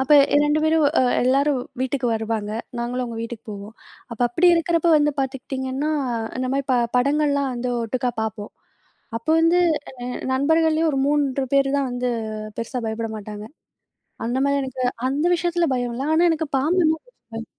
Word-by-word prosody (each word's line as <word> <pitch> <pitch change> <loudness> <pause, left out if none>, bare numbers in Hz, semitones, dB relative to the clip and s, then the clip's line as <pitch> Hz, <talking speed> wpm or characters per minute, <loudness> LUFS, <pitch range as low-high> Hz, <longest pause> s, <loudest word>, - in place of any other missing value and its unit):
அப்ப 265 - -2 0.4
2 300 +1 +2
பேரும், 315 -1 +3 0.2
அ - - +4 0.2
எல்லாரும் 275 +1 +2 0.2
வீட்டுக்கு 260 -1 -1
வருவாங்க. 220 -1 -2 0.3
நாங்களும் 245 +1 -2
அவங்க 230 -2 -6
வீட்டுக்குப் 230 -1 -8
போவோம். 205 +2 -8 0.4
அப்ப 235 - -10
அப்படி 340 +9 +3
இருக்கிறப்போ 335 0 +2
வந்து 295 0 +2
பாத்துக்கிட்டீங்கன்னா, 265 +2 -3 0.5
அந்த 255 0 -2
ம 275 - +1
பட 245 - +3 0.2
படங்கள் 290 +3 +2
எல்லாம் 280 -1 0
வந்து 245 +1 -3
ஒட்டுக்கா 245 +2 -1
பார்ப்போம். 215 -1 -5 0.7
அப்போ 235 +7 -3
வந்து 330 +2 +4 0.4
அ - - -4 0.3
நண்பர்கள்லியும் 320 +3 +2
ஒரு 270 - 0
3 280 -2 +1
பேரு 275 0 +4
தான் 270 -2 0
வந்து 245 0 -2 0.5
பெருசா 230 +2 -3
பயப்பட 220 0 -3
மாட்டாங்க. 210 0 -8 0.8
அந்த 240 +2 -1
மாரி 280 0 +2
எனக்கு 260 -1 -4 0.3
அந்த 290 +5 0
விஷயத்துல 345 0 0
பயம் 245 -1 -2
இல்ல. 265 - -3
ஆனா, 330 - +4
எனக்குப் 315 -3 -2
பாம்புன்னா 320 +3 +2
கொஞ்சம் - - -28
பயம். 225 0 -5
265 Hz, 165 wpm, -22 LUFS, 240-305 Hz, 0.8 s, அ